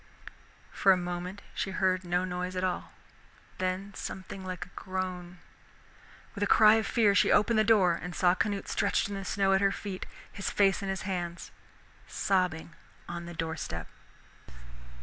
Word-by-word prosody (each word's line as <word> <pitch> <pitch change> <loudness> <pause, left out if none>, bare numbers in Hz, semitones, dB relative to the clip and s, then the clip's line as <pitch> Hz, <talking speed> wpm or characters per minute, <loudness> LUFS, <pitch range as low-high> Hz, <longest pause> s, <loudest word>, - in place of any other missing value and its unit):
For 195 - +4
a 185 - +5
moment 180 +2 -5
she - - -2
heard 185 -1 +1
no 180 +1 0
noise 180 0 -4
at 185 - -2
all, 185 -1 -2 0.7
then 185 +2 -2
something 190 0 -7
like 185 -1 -5
a - - -19
groan. 185 -1 -4 1.0
With 200 - -3
a - - +2
cry 215 +1 +7
of 220 - -1
fear 215 -4 +3
she - - +4
opened 215 +1 +4
the - - +5
door, 195 -6 +4
and 180 0 -6
saw 180 -1 +4
Canute 200 +1 -1
stretched - - +1
in - - -5
the 195 0 -4
snow 195 0 +1
at 190 - +3
her 195 0 +3
feet, 195 -2 -6 0.2
his 200 - -3
face 195 -2 +3
in 195 - -3
his 190 -1 -3
hands, 175 -2 -4 0.6
sobbing 180 -4 0 0.3
on 170 0 -6
the 175 - -8
doorstep. 160 - -4
185 Hz, 170 wpm, -29 LUFS, 180-195 Hz, 1.0 s, cry